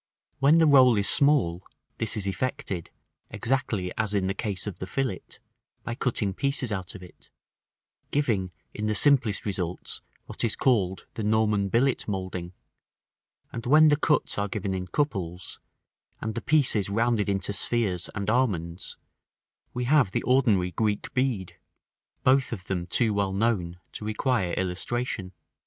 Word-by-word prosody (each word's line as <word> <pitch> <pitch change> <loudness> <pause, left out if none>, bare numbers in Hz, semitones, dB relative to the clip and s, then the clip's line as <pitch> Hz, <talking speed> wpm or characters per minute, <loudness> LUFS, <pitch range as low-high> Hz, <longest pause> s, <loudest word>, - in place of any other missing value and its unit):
When 140 +4 +5
the 165 - +5
roll 130 -6 +6
is 100 - +2
small, 135 - +3 0.4
this 115 -1 -1
is 100 - -1
effected, 100 - -3 0.4
exactly 115 -8 -1
as 105 -1 0
in 95 -2 +1
the 95 - 0
case 100 -1 -3
of 105 -4 -6
the 95 - -5
fillet, 130 -6 -2 0.6
by 115 - -4
cutting 115 -5 -1
pieces 140 0 -1
out 95 -3 -4
of 90 - -10
it; 90 - -16 0.8
giving 110 -11 0 0.2
in 105 0 -3
the 105 - 0
simplest 125 -4 +4
results 90 -4 -3 0.2
what - - -4
is 115 - +2
called 100 -8 +1
the 110 - -4
Norman 105 -2 +2
billet 125 +5 +1
moulding: 95 -3 -4 1.0
and 120 +1 -5
when 155 +3 +7
the 145 - +5
cuts 150 -7 +1
are 100 - 0
given 100 -1 -3
in 90 -1 -4
couples, 95 - -3 0.6
and 110 - -3
the 115 - -4
pieces 130 -10 +2
rounded 115 0 +1
into 100 0 -1
spheres 100 -4 0
and 100 -2 -3
almonds, 95 -8 -1 0.7
we 125 - -3
have 130 -6 +3
the - - -1
ordinary 110 -9 +2
Greek 105 +3 -2
bead, 125 -8 -1 0.6
both 130 0 +3
of 95 -6 -6
them 90 -2 -3
too 110 +3 +2
well 100 -1 0
known 95 -5 0
to - - -8
require 110 -3 0
illustration. 95 +2 -3
105 Hz, 150 wpm, -26 LUFS, 95-125 Hz, 1.0 s, when